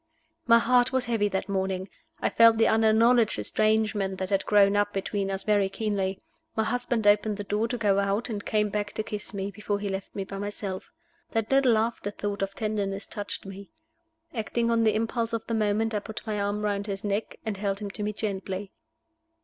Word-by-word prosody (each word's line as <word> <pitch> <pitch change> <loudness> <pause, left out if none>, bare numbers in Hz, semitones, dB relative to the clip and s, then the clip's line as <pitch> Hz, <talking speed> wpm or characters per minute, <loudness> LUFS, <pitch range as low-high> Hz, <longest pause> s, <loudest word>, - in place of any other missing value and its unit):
My 230 0 +8
heart 245 +1 +3
was 260 -1 +1
heavy 225 -3 +1
that 190 -1 -2
morning: 190 -1 -1 0.3
I - - +1
felt 230 -1 +6
the 225 - +4
unacknowledged 225 +1 +4
estrangement 215 -3 +1
that 190 +1 -4
had 195 -1 +1
grown 205 -1 +5
up 205 0 +1
between 195 0 -2
us 195 0 -3
very 205 -2 +2
keenly. 195 -2 -2 0.4
My 220 - +2
husband 245 -1 -1
opened 205 0 +4
the 205 - -4
door 210 +3 0
to 245 - -3
go 200 -3 +2
out, 200 +3 0
and 210 -3 -4
came 210 -1 +1
back 205 0 -3
to 215 - -2
kiss 210 -3 -5
me 200 0 -4
before 205 +1 -2
he 200 0 -3
left 190 0 -5
me 195 - -2
by 195 0 -7
myself. 205 -2 -5 0.4
That 225 +1 -1
little 265 -4 +5
after 220 -2 -1
thought 205 0 -4
of 195 0 -2
tenderness 205 -3 -2
touched 205 -2 -6
me. 195 0 -9 0.6
Acting 235 0 -1
on 230 -1 +3
the 215 -1 +3
impulse 230 +1 -1
of 230 - -2
the 230 - -3
moment, 220 +1 +1
I 210 - +1
put 215 +2 -8
my 210 -2 -2
arm 205 +1 -1
round 205 0 -1
his 195 -1 -4
neck, 205 +1 -2
and 215 -3 -2
held 195 -1 -1
him 200 -1 -4
to 210 - -4
me 210 0 -1
gently. 195 -2 -4
210 Hz, 205 wpm, -27 LUFS, 200-225 Hz, 0.6 s, My